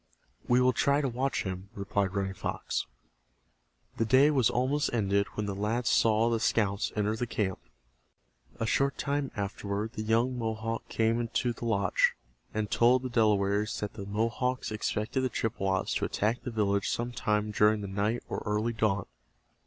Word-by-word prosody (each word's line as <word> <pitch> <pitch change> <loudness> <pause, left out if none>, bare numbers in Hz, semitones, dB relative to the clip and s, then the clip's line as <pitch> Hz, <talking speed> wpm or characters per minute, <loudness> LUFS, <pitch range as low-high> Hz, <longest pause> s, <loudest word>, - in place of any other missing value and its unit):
"We 125 0 +4
will 125 0 +4
try 140 +5 +2
to 145 - 0
watch 130 +1 -1
him," 95 0 -5
replied 100 -1 -1
Running 95 -1 -1
Fox. - - -3 1.1
The - - +2
day 130 +6 +5
was 130 -6 +3
almost 135 +4 +1
ended 100 -3 +1
when 105 - -2
the 100 - -2
lads 110 +5 -1
saw 115 +1 +3
the 115 - +1
scouts 100 -3 +1
enter 105 0 0
the 120 +2 -3
camp. 100 -4 -2 1.0
A 115 - 0
short 140 +5 +1
time 140 -1 -1
afterward 100 +1 -3
the 110 - -4
young 115 +3 +1
Mohawk 115 0 -3
came 115 +1 +1
to 120 +1 0
the 120 - -7
lodge, 100 -4 +2 0.4
and 105 -1 -2
told 125 +2 +4
the 130 - -3
Delawares 105 -2 +2
that 105 - -4
the 100 -3 -7
Mohawks 115 +4 -1
expected 110 +4 -1
the 130 - 0
Chippewas 95 -5 -1
to - - 0
attack 110 +4 0
the - - -5
village 100 -3 0
some 120 +1 -2
time 105 -3 0
during 105 0 +3
the 100 - -4
night 105 +4 -1
or - - -4
early 105 +3 0
dawn. 100 -3 0
110 Hz, 170 wpm, -29 LUFS, 100-120 Hz, 1.1 s, day